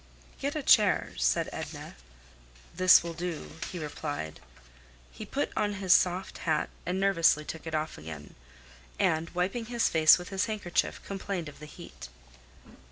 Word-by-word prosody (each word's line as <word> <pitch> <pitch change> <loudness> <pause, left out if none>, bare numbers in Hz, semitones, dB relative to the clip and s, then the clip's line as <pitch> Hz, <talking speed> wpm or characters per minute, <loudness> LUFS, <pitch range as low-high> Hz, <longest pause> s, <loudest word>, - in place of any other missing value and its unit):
"Get - - -2
a - - -2
chair," - - +4
said 60 +1 +1
Edna. - - -7 0.8
"This 185 0 +7
will 170 0 -5
do," 170 -2 -5 0.2
he 180 - -6
replied. 145 - -5 0.7
He - - -9
put - - -2
on 205 -1 0
his 190 -2 +3
soft 185 +1 +1
hat 155 -3 0 0.2
and 180 +1 -1
nervously 170 -6 +3
took 160 +1 -7
it 160 - -3
off 155 - -3
again, 75 -1 -9 0.6
and 165 -4 +1
wiping 195 +6 -1
his 235 0 +1
face 155 -1 +6
with 180 0 -8
his 195 +1 -1
handkerchief, 205 -5 -1
complained 195 -3 -4
of 145 - -15
the 150 - -10
heat. 145 - -11
170 Hz, 155 wpm, -29 LUFS, 155-190 Hz, 0.8 s, This